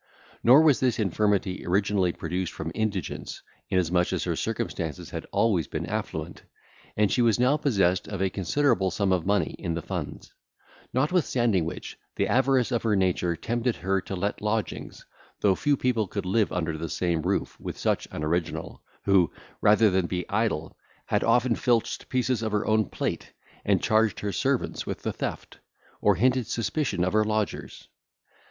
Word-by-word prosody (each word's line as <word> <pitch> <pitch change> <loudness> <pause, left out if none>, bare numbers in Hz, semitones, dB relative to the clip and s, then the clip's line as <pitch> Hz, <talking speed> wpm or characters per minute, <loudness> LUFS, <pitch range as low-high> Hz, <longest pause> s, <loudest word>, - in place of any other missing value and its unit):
Nor 130 +7 +7
was 150 -5 +5
this 130 -2 +1
infirmity 100 -2 0
originally 95 0 +1
produced 90 +2 -3
from 80 0 -5
indigence, 100 -5 -3 0.3
inasmuch 90 -1 +1
as - - -1
her - - -1
circumstances 80 -4 -3
had - - -4
been - - -23
always 95 -10 +2
affluent, - - -4 0.6
and 105 -2 +3
she 125 - +2
was 115 -1 +3
now 125 +4 +4
possessed 95 -12 +1
of 100 -3 -5
a 95 -1 +1
considerable 95 - +1
sum 95 +1 0
of 90 -1 +1
money 100 -2 +1
in 85 -2 -2
the 85 - -3
funds; 85 -6 -6 0.6
notwithstanding 125 - +1
which, 85 - -7 0.2
the - - +1
avarice 130 -1 +2
of 120 - +1
her 110 -2 +1
nature 90 -2 +1
tempted 120 +5 -1
her 95 +1 0
to 95 - -5
let 100 +3 -2
lodgings, 105 +1 -3 0.4
though 100 -2 +4
few 145 +8 +1
people 115 -5 +1
could 100 0 -4
live 105 +3 +1
under 80 -2 -1
the 85 0 -4
same 85 -1 0
roof - - -1
with - - -6
such - - 0
an 75 - -5
original, 85 +2 -2 0.2
who, 95 -4 +4 0.3
rather 105 0 +5
than 95 -2 +1
be 90 -1 -3
idle, 100 -7 -1 0.3
had - - 0
often 125 0 +3
filched 115 -1 0
pieces 125 -2 0
of 110 -1 -2
her 105 0 0
own 110 0 +3
plate, - - -4 0.3
and - - +2
charged 110 0 +2
her 105 - -2
servants 135 +4 -1
with - - -6
the - - -2
theft, - - -5 0.4
or 105 -1 +4
hinted 125 +4 +2
suspicion 115 - -1
of 95 - 0
her 110 0 +4
lodgers. 105 -1 -3
100 Hz, 170 wpm, -26 LUFS, 90-115 Hz, 0.6 s, Nor